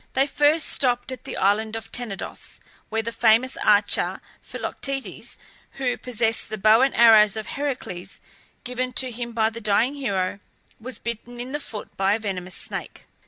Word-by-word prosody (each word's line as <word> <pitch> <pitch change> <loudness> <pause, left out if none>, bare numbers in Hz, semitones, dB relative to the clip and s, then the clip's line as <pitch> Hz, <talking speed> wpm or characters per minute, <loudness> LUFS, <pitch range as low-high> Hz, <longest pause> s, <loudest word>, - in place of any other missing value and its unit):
They 270 - +3
first 295 +2 +3
stopped 245 -1 +1
at 255 - -8
the - - -5
island 215 +3 +1
of 225 - -7
Tenedos, 235 -6 -6 0.3
where 225 0 -1
the 230 - -3
famous 230 +3 +3
archer 205 0 +3 0.2
Philoctetes 275 -1 -5 0.4
who 255 -2 -1
possessed 230 -2 0
the 215 - -4
bow 215 +3 +5
and 270 +1 +2
arrows 220 -3 +7
of 215 - -4
Heracles, 255 -11 -5 0.4
given 250 0 -3
to 255 -1 +1
him 235 0 -5
by 220 -1 +2
the 230 +1 -8
dying 215 +5 +2
hero 200 -9 -2 0.4
was 245 0 -5
bitten 235 +1 -6
in 250 +2 -5
the 295 - -2
foot 220 -7 -7
by 195 +1 +3
a 220 - 0
venomous 185 -4 -4
snake. - - -6
230 Hz, 165 wpm, -24 LUFS, 215-255 Hz, 0.4 s, arrows